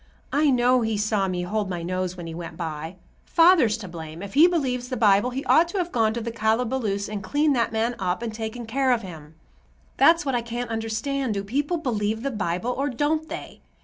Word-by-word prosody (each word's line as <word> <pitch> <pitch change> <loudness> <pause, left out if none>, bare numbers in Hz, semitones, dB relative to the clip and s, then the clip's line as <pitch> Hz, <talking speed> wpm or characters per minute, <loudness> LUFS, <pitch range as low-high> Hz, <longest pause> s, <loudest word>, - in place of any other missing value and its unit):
I 295 +1 +3
know 250 -1 +3
he 220 -2 0
saw 210 -2 +1
me 180 -1 -2
hold 205 +2 -2
my 175 -2 -4
nose 185 +1 -3
when 175 - -7
he 165 - -6
went 165 -1 -7
by. 160 0 -5 0.3
Father's 330 - +4
to 210 -4 -8
blame. 165 0 -8
If 200 0 -8
he 315 +5 +7
believes 255 -8 -1
the 255 - -3
Bible, 210 +1 +4
he 265 +2 -5
ought 335 +2 +5
to 345 - -5
have 350 -2 -1
gone 225 -2 +2
to 235 - -2
the 230 +1 -4
calaboose 220 -2 0
and 210 -1 -5
cleaned 290 +9 +1
that 235 -2 +1
man 225 +2 0
up 185 +3 -1
and 225 -2 -4
taken 225 +2 -5
care 260 +3 +1
of 230 -2 -1
him. 160 -4 -10 0.6
That's 330 -1 +5
what 270 - -1
I 240 - +1
can't 235 +1 -5
understand; 225 +3 -2
do 200 - -2
people 285 - -1
believe 220 -6 -2
the 275 - -1
Bible, 205 +1 -2
or 275 +3 -1
don't 305 +5 -1
they? 335 - -8
225 Hz, 220 wpm, -24 LUFS, 195-265 Hz, 0.6 s, he